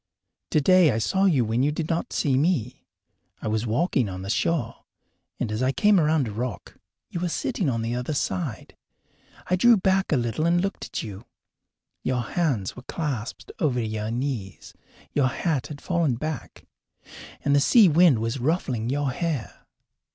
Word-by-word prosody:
Today 175 +3 +5
I 110 - +1
saw 190 - +1
you 145 -11 +3
when 115 +3 0
you 145 +2 +2
did 155 +1 -3
not 165 0 -2
see 140 -4 +1
me. 130 -5 0 0.5
I - - -5
was 110 +2 -1
walking 125 - +1
on 95 0 -6
the 100 - -3
shore, 125 -3 -1 0.6
and 115 - -2
as 105 +3 -2
I 130 +1 +2
came 210 +6 +4
around 155 -4 +2
a - - -4
rock 115 -1 -5 0.4
you 175 - -3
were 175 0 -1
sitting 170 0 -1
on 115 -3 -1
the 115 +1 -2
other 125 +5 -2
side. 140 -5 -3 0.7
I 180 - +2
drew 235 +5 +6
back 190 0 +1
a 150 - +4
little 120 +7 0
and 175 +1 +3
looked 195 +2 -3
at - - -4
you. 100 -2 -8 0.8
Your 125 -1 0
hands 130 - -1
were 125 - -9
clasped 135 -5 -5
over 135 -6 +1
your 110 -1 -3
knees; 120 -5 -4 0.4
your 140 -3 +3
hat 150 -1 -1
had 145 -2 -8
fallen 170 -8 +1
back, 155 +1 -6 0.8
and 140 0 +3
the - - +5
sea 210 - +6
wind 165 -4 +5
was 115 +4 -2
ruffling 125 -5 -1
your 140 0 0
hair. 155 -5 -4
140 Hz, 175 wpm, -25 LUFS, 115-165 Hz, 0.8 s, drew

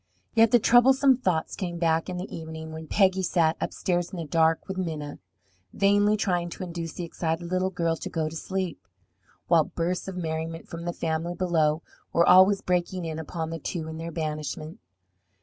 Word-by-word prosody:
Yet 225 0 +5
the 240 - +6
troublesome 260 +3 +5
thoughts 180 -10 -1
came 175 -3 -4
back 165 0 +1
in 180 - -4
the 180 +3 -6
evening, 160 -1 -7
when 160 0 -8
Peggy 190 0 +3
sat 170 -3 +2
upstairs 175 -1 -1
in 185 - -8
the 165 - -4
dark 160 +1 +2
with 190 - -4
Minna, 155 -6 -4 0.5
vainly 205 +1 +3
trying 175 -4 0
to 180 - -7
induce 170 -2 -5
the 180 - -5
excited 165 0 -3
little 185 +1 +1
girl 170 -3 0
to - - -6
go 160 -1 -1
to 155 - -7
sleep, 185 0 -3 0.7
while - - +4
bursts 175 +3 -2
of 190 -1 -5
merriment 165 -1 -4
from 170 0 -7
the 175 - -1
family 165 +2 -2
below 160 -4 +1 0.3
were 170 - +4
always 190 +2 +7
breaking 180 -1 -1
in 160 -1 -4
upon 160 0 -4
the 165 - -4
two 160 +1 -4
in 160 0 -6
their 165 +1 -5
banishment. 155 -1 -4
170 Hz, 185 wpm, -26 LUFS, 160-185 Hz, 0.7 s, always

